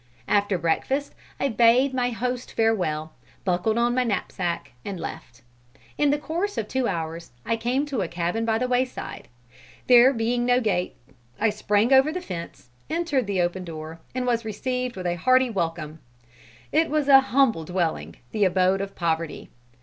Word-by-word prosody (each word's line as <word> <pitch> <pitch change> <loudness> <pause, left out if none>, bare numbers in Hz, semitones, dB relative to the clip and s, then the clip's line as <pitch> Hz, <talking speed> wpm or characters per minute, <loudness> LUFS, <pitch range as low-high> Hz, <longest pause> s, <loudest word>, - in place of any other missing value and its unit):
After 205 -2 +2
breakfast, 265 - -1 0.3
I - - +1
bade 240 +4 +4
my 250 -1 +1
host 245 +1 -3
farewell, 160 -9 0 0.3
buckled 185 +4 +1
on 240 +1 +2
my 255 0 +2
knapsack 190 - -2
and 195 -3 -5
left. 160 -3 -8 0.5
In 295 -1 +2
the 290 - +2
course 335 +8 -3
of 210 - -2
two 260 0 0
hours, 165 -1 -4 0.2
I 230 - +1
came 245 +5 0
to 275 -7 -2
a 180 - -1
cabin 175 +6 -2
by 225 -1 +1
the 250 +2 -1
wayside. 255 0 -2 0.6
There 250 +1 +7
being 240 0 0
no 245 0 +3
gate, 195 -7 -1 0.4
I 225 0 +3
sprang 210 +3 +2
over 265 +3 +5
the 365 - -3
fence, 170 - -8 0.2
entered 315 -8 0
the 195 -3 0
open 175 +1 -1
door, 160 -1 -8 0.2
and 255 -1 -1
was 235 -2 +1
received 250 +3 -3
with 185 -1 -6
a 175 0 0
hearty 255 +6 +3
welcome. 165 -5 -3 0.7
It 325 +1 +2
was 300 -2 0
an 270 -1 +8
humble 265 -9 +2
dwelling, 175 -1 -2 0.2
the 210 - +1
abode 185 +1 +3
of 195 0 -6
poverty. 165 -2 -2
225 Hz, 170 wpm, -25 LUFS, 175-255 Hz, 0.7 s, an